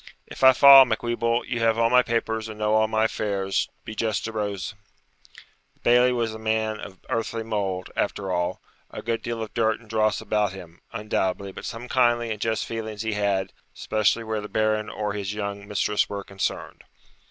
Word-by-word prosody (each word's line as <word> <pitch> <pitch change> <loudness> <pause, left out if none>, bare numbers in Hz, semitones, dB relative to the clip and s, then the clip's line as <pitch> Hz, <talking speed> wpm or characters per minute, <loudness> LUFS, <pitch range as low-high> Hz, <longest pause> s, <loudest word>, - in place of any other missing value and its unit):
'If - - -9
I 130 0 +9
fall, 135 +1 +10
Macwheeble, 120 0 -1
you 120 - -3
have 115 -1 +2
all 115 0 +2
my 125 0 +7
papers 115 -2 -2
and 110 - -8
know 105 0 0
all 110 0 +4
my 110 0 +1
affairs; 100 -3 -1 0.2
be - - -6
just 110 -1 -1
to 115 - -4
Rose.' 105 -1 -3 1.0
The - - -35
Bailie 125 +1 +4
was 115 -3 -1
a 110 - -8
man 110 -1 -1
of 95 -2 -9
earthly 115 0 -2
mould, 100 -4 -3
after 95 -1 -2
all; 90 -1 -1 0.3
a - - -8
good 115 0 -1
deal 115 -1 -3
of 110 - -9
dirt 110 -1 +1
and 115 - -19
dross 110 -1 +1
about 105 -3 0
him, 85 -3 -12
undoubtedly, 100 -3 -2
but - - -9
some 115 +1 -6
kindly 120 -2 +2
and 105 -1 -5
just 110 -1 -1
feelings 110 -2 -5
he 110 -1 -1
had, 100 -2 -1 0.2
especially 110 +1 +1
where 110 -1 -3
the 105 - -8
Baron 110 0 0
or 105 -1 -3
his 100 0 -4
young 100 -1 -5
mistress 105 +1 0
were 100 -1 -5
concerned. 95 0 -4
110 Hz, 195 wpm, -25 LUFS, 105-115 Hz, 1.0 s, fall